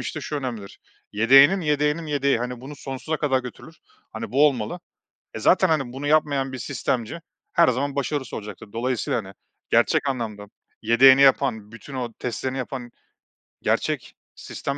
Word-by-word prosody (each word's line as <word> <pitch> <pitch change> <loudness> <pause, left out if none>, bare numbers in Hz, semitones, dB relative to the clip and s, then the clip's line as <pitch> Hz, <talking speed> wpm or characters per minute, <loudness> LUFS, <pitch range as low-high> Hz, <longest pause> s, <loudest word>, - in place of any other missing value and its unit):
işte 115 -2 -5
şu 150 - -4
önemlidir. 120 -8 -6 0.3
Yedeğinin 135 - +6
yedeğinin 150 +1 0
yedeği, 140 -3 +1
hani, 125 0 -5
bunu 145 +3 -9
sonsuza 135 +4 -4
kadar 135 -3 +1
götürür. 125 -2 -11 0.4
Hani, - - -6
bu 145 +3 +5
olmalı. 130 +4 -2 0.5
E - - -4
zaten, 185 - +4
hani, 135 -6 0
bunu 135 +3 -6
yapmayan 145 -3 +1
bir 130 - -6
sistemci, 120 +7 -3 0.3
her 170 -1 +4
zaman 140 +3 -1
başarısız 140 -2 -2
olacaktır. 105 -1 -9
Dolayısıyla, 120 0 -1
hani, 95 -3 -7 0.4
gerçek 140 - +2
anlamda, 110 -5 -4 0.4
yedeğini 130 +4 +6
yapan, 120 -6 +2
bütün 135 +4 -11
o 120 -3 -4
testlerini 130 +2 -3
yapan, 125 -1 -6 0.7
gerçek - - -1 0.2
sistem 140 0 -5
130 Hz, 150 wpm, -23 LUFS, 120-145 Hz, 0.7 s, Yedeğinin